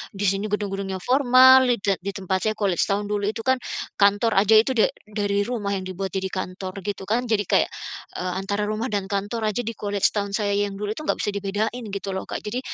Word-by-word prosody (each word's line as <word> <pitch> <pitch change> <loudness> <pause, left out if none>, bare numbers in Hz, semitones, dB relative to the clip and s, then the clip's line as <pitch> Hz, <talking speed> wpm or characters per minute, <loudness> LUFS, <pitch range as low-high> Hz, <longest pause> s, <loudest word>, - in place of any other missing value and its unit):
Di 195 - -3
sini 195 +2 +1
gedung-gedungnya 195 -2 -2
formal, 260 0 +6
di 245 - +2
te 195 -2 +1
di 195 +2 -5
tempat 190 -1 -1
saya 215 - +2
kalau 200 -3 0
College - - +2
Town 205 +1 0
dulu 205 -1 0
itu 225 +1 -3
kan, 260 0 +3 0.4
kantor 205 +3 +4
aja 215 +2 +5
itu 225 +5 +4
da 230 - +4 0.2
dari 205 -1 0
rumah 220 -5 -2
yang 190 - -4
dibuat 185 0 -5
jadi 190 0 -1
kantor 185 +1 -5
gitu 200 -1 -3
kan. 240 +5 0
Jadi 215 -2 +1
kayak, - - +2 0.5
eee, 180 0 -2
antara 200 +2 -1
rumah 215 +3 -2
dan 205 -2 -1
kantor 205 +3 -2
aja 210 - -2
di 230 - -3
College 205 -1 +1
Town 200 -1 -1
saya 205 -1 0
yang 205 0 0
dulu 205 0 -3
itu 310 - -7
nggak - - 0
bisa - - 0
dibedain 205 +5 -2
gitu 200 0 -4
loh, 190 - -4
Kak. - - -4
Jadi 220 +4 -4
205 Hz, 230 wpm, -24 LUFS, 195-220 Hz, 0.5 s, formal